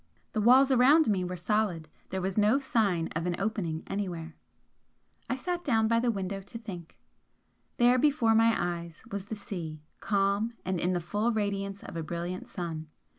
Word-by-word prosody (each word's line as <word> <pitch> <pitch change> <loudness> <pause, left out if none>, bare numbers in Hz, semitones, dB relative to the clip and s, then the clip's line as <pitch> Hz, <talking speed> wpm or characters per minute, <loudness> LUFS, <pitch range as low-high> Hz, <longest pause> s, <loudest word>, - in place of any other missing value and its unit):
The 215 - -1
walls 260 +5 +6
around 265 +2 +6
me 190 -3 +1
were 180 0 -3
solid; 180 -3 0 0.2
there 190 -1 -3
was 190 0 -1
no 215 +4 +4
sign 215 -11 +1
of 165 +2 -1
an 175 - 0
opening 195 -6 -2
anywhere. 175 -5 -4 0.9
I - - +1
sat 350 +6 -3
down 225 -5 +2
by 230 +1 +3
the 240 +1 +1
window 195 -2 -2
to 200 +4 -9
think. 185 -7 -9 0.8
There 245 +1 +5
before 275 -6 +3
my 225 0 +5
eyes 170 -2 -4
was 200 -1 -4
the 220 - -4
sea, 165 -7 -6 0.2
calm, 200 +3 +1
and 185 -1 -1
in 180 +2 +1
the 175 - 0
full 210 +7 0
radiance 200 -2 -2
of - - -9
a 165 - -2
brilliant 170 +3 -4
sun. 160 -3 -5
200 Hz, 175 wpm, -29 LUFS, 175-225 Hz, 0.9 s, walls